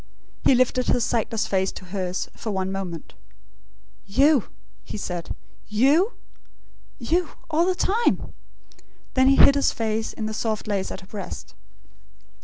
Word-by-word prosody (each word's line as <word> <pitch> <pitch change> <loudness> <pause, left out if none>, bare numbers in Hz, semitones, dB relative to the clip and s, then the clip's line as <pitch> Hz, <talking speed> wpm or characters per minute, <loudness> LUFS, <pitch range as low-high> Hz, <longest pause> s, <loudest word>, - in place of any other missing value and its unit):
He 265 - +6
lifted 255 0 +2
his 245 - +2
sightless 225 -1 0
face 190 -1 0
to 185 - -9
hers, 185 -1 -3
for 225 - -5
one 190 -2 -1
moment. 185 -4 -5 0.9
"You?" 275 +4 +4 0.4
he - - -6
said. 175 -4 -5 0.3
"YOU? 280 - +3 0.8
You 325 +7 0 0.2
all 330 +3 +3
the 370 - +2
time?" 440 +6 +1 0.8
Then 260 0 +4
he 275 - +6
hid 280 - +8
his 280 0 +2
face 220 -1 -2
in 220 - -4
the 215 - -3
soft 215 -1 -2
lace 200 -2 -1
at - - -7
her - - -14
breast. 200 -2 -7
220 Hz, 145 wpm, -24 LUFS, 195-275 Hz, 0.9 s, hid